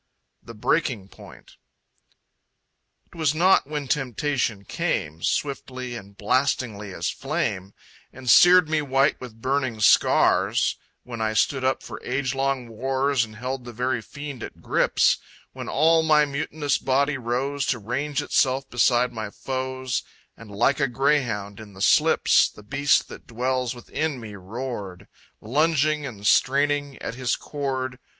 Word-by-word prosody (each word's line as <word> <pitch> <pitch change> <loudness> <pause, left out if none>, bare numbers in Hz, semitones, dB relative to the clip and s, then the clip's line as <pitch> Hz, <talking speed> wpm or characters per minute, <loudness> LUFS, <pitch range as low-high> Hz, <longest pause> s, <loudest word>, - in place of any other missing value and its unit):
The 115 - -12
Breaking 110 - 0
Point - - -15 1.5
It - - -25
was 155 -3 +1
not 180 -3 +4
when 150 -2 -4
temptation 125 -5 -1
came, 80 -2 -2
Swiftly 130 -2 -3
and 100 -3 -11
blastingly 110 -3 0
as 85 -1 -2
flame, 115 - -3 0.4
And 130 0 -12
seared 175 +5 +7
me 155 -1 +1
white 135 0 +1
with 115 -3 -10
burning 130 -4 -1
scars; 105 - +3 0.3
When 120 -2 -7
I 110 0 0
stood 130 +4 +1
up 130 0 0
for - - -9
age 130 0 -1
long 135 -2 -1
wars 130 +3 0
And 110 -1 -9
held 125 +3 -4
the 120 0 -9
very 125 0 -1
Fiend 140 +1 -8
at - - -8
grips; - - +2 0.3
When - - -7
all 160 +3 +4
my 155 -2 +4
mutinous 145 0 -2
body 140 +1 +1
rose 135 +4 -2
To 125 - +1
range 130 +6 -2
itself 135 +1 +1
beside 125 0 +2
my 110 -2 -5
foes, 130 +2 -3 0.3
And, 115 -2 -13
like 120 +7 +1
a 140 - +2
greyhound 120 -6 0
in 105 -2 -11
the 95 - -13
slips, - - +4
The 105 - -15
Beast 140 +7 +2
that - - -11
dwells 125 +1 -1
within 140 +3 -3
me 110 -3 -9
roared, 100 -2 -7 0.3
Lunging 150 +3 +1
and 105 -5 -9
straining 145 +3 +2
at - - -4
his 125 0 -1
cord.... 130 -3 -4
130 Hz, 145 wpm, -24 LUFS, 115-140 Hz, 1.5 s, seared